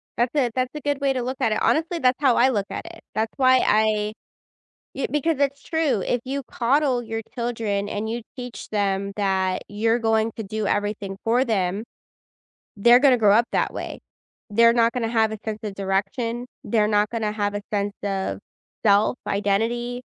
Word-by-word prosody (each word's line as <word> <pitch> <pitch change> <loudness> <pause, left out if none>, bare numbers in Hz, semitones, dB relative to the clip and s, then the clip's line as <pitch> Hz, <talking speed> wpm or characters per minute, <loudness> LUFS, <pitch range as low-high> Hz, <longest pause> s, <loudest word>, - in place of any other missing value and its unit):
That's 240 +1 0
a 265 -5 +2
that's 255 0 -1
a 300 - -5
good 285 0 -1
way 275 -1 +2
to 255 - -2
look 255 +2 -3
at 225 - +2
it. 215 - +1
Honestly, 330 +2 +1
that's 255 -2 +2
how 260 -4 +4
I 255 +2 +5
look 205 -6 0
at - - -6
it. 335 0 -11
That's 220 +1 -1
why 260 -1 +5
I 215 0 +2 0.8
yeah, 270 - -2
because 295 +2 +1
it's 280 0 0
true. 310 - 0
If 245 +5 -1
you 275 +2 -3
coddle 255 +1 +1
your 225 0 -4
children 225 -4 -2
and 215 +2 -3
you 235 +1 -3 0.2
teach 245 -2 -7
them 200 -1 0
that 190 -2 0
you're 225 +3 +1
going 225 -1 +1
to 225 - -4
do 215 +1 -3
everything 205 -1 -2
for 240 +3 +3
them, 200 -3 -1 0.9
they're 240 +4 +7
gonna 260 -2 +5
grow 210 -3 +5
up 235 - +4
that - - 0
way. - - -6 0.5
They're 230 +2 +5
not 230 -1 +3
gonna 230 -3 -1
have 220 -2 +2
a 220 - -4
sense 215 -1 -3
of 205 -2 -5
direction, 200 +5 -2 0.2
they're 215 -3 +2
not 210 0 +2
gonna 220 -3 -2
have 205 -1 -1
a 205 - -3
sense 205 -1 -1
of 195 -1 -2 0.5
self, 205 +4 +4
identity, 230 +5 0
225 Hz, 190 wpm, -23 LUFS, 205-250 Hz, 0.9 s, they're